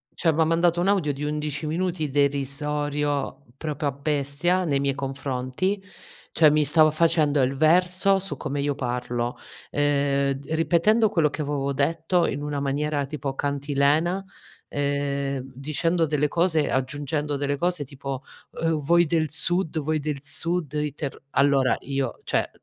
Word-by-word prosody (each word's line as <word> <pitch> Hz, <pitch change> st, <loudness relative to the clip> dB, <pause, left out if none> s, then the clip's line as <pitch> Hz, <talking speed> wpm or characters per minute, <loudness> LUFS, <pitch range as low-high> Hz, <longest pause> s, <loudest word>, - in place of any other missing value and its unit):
Cioè, 165 Hz, -2 st, +2 dB
m'ha 160 Hz, +1 st, +3 dB
mandato 170 Hz, +1 st, +2 dB
un 185 Hz, -, +1 dB
audio 180 Hz, -8 st, +2 dB
di 140 Hz, +2 st, -6 dB
11 150 Hz, 0 st, -2 dB
minuti 165 Hz, -1 st, -1 dB
derisorio 145 Hz, 0 st, -1 dB
proprio 150 Hz, -2 st, -2 dB
a -, -, -3 dB
bestia 145 Hz, +5 st, 0 dB
nei 140 Hz, -3 st, +1 dB
miei 140 Hz, -1 st, 0 dB
confronti, 135 Hz, +7 st, -2 dB, 0.5 s
cioè 155 Hz, -2 st, +5 dB
mi 150 Hz, 0 st, +3 dB
stava 155 Hz, +2 st, +5 dB
facendo 155 Hz, -3 st, +2 dB
il 130 Hz, +2 st, +1 dB
verso 180 Hz, +5 st, +4 dB
su 165 Hz, -8 st, -4 dB
come 140 Hz, 0 st, -3 dB
io 145 Hz, 0 st, 0 dB
parlo, 120 Hz, -2 st, -2 dB, 0.4 s
ehm, 140 Hz, -1 st, +1 dB
d 135 Hz, +1 st, -9 dB
ripetendo 200 Hz, +7 st, +3 dB
quello 160 Hz, -6 st, +2 dB
che 150 Hz, -, -5 dB
avevo 140 Hz, -1 st, -1 dB
detto 165 Hz, +5 st, +1 dB
in 145 Hz, -, -2 dB
una 145 Hz, -1 st, -3 dB
maniera 145 Hz, +1 st, -1 dB
tipo 140 Hz, -1 st, -4 dB
cantilena, 145 Hz, +6 st, +1 dB, 0.5 s
ehm, 140 Hz, -1 st, -1 dB
dicendo 155 Hz, +5 st, 0 dB
delle 150 Hz, -1 st, +1 dB
cose 165 Hz, -3 st, +2 dB
aggiungendo 145 Hz, +3 st, -1 dB
delle 145 Hz, 0 st, -1 dB
cose 175 Hz, -2 st, 0 dB
tipo: 135 Hz, 0 st, -6 dB, 0.4 s
"Uhm, 165 Hz, -2 st, +1 dB
voi 170 Hz, +4 st, +3 dB
del 155 Hz, -1 st, 0 dB
sud 175 Hz, 0 st, 0 dB
voi 155 Hz, +1 st, -1 dB
del 145 Hz, -1 st, -3 dB
sud, 160 Hz, +1 st, -1 dB
i 150 Hz, -2 st, -1 dB
terr" 145 Hz, -3 st, -5 dB, 0.2 s
Allora 140 Hz, -2 st, +3 dB
io: 135 Hz, -2 st, -3 dB
"Cioè, -, -, 0 dB
145 Hz, 150 wpm, -25 LUFS, 140-165 Hz, 0.5 s, cioè